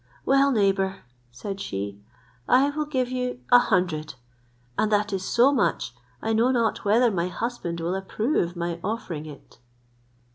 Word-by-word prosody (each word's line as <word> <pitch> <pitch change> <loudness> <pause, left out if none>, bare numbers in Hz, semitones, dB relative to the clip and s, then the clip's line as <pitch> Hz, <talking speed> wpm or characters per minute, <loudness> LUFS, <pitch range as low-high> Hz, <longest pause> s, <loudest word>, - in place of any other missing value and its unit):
"Well, 275 +1 +4
neighbour," 195 -4 +1 0.3
said 195 - -6
she, 100 - -5 0.5
"I 275 +3 +5
will 305 +1 -2
give 260 -4 -1
you 250 -1 -3
a 245 - +9
hundred, 165 - 0 0.6
and 215 - +1
that 210 0 +1
is 190 -1 -2
so 245 +7 +4
much, 250 - 0 0.3
I 225 - 0
know 230 +3 +3
not 235 -3 +1
whether 230 +4 +4
my 175 -2 0
husband 185 -4 -4
will 170 +2 -1
approve 195 - -1
my 170 0 -3
offering 180 -8 -4
it." 145 -5 -13
205 Hz, 150 wpm, -25 LUFS, 175-245 Hz, 0.6 s, a